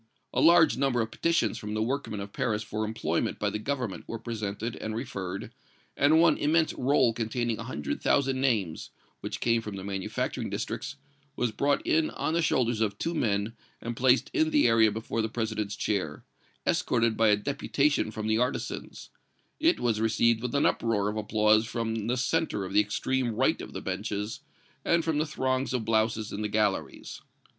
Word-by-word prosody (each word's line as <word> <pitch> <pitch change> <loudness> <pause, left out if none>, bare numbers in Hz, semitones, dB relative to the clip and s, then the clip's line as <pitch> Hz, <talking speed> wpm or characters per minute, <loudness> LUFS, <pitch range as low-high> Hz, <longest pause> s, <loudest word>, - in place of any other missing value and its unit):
A 130 - +1
large 165 -2 +6
number 135 -2 +1
of 110 0 -3
petitions 165 +7 +1
from 105 0 -5
the 110 - 0
workmen 125 -3 -2
of 100 0 -8
Paris 110 -5 -1
for 105 +1 -3
employment 110 +1 -1
by - - -1
the 105 - -3
Government 125 -4 -3
were 115 - -4
presented 110 -1 -4
and 110 0 -4
referred, 100 -6 -5 0.4
and 150 +3 +4
one 170 - +4
immense 155 +2 +2
roll 130 -2 +2
containing 115 0 -2
a 115 - -5
hundred 75 - -4
thousand 135 -2 +2
names, 105 -12 0 0.3
which - - -5
came 115 -1 +2
from 105 -2 -6
the 95 - -6
manufacturing 95 -1 -3
districts, 130 +1 -4 0.4
was 120 -2 0
brought 140 +6 0
in 160 0 +2
on - - -2
the 170 - +2
shoulders 120 -7 +1
of 100 -2 0
two 170 - -2
men 105 -6 0 0.3
and 120 0 -5
placed 130 +2 +3
in 320 -2 +2
the 300 -2 +4
area 110 -1 +5
before 110 +1 -3
the 110 - -1
President's 110 -3 -2
chair, 80 - -2 0.4
escorted 115 -1 +2
by 110 0 +3
a 105 - +6
deputation 140 +2 0
from 110 0 -5
the 110 +1 +2
artisans; 125 +2 -3 0.5
it 325 +3 +3
was 115 -3 0
received 115 +1 +2
with 125 +3 -3
an 140 - +3
uproar 105 -3 +1
of 105 - -4
applause 110 +1 +3
from 115 -2 -2
the 125 +2 0
centre 130 -6 0
of 95 - -7
the 105 - +5
extreme 120 +3 -1
right - - +2
of - - -8
the - - -5
benches, 105 +2 -3 0.4
and 170 -1 +2
from 160 -2 +1
the 155 - 0
throngs 130 -2 -1
of 115 -3 -2
blouses 110 -1 0
in 105 - -4
the 105 - 0
galleries. 105 -2 -1
115 Hz, 185 wpm, -28 LUFS, 105-130 Hz, 0.5 s, large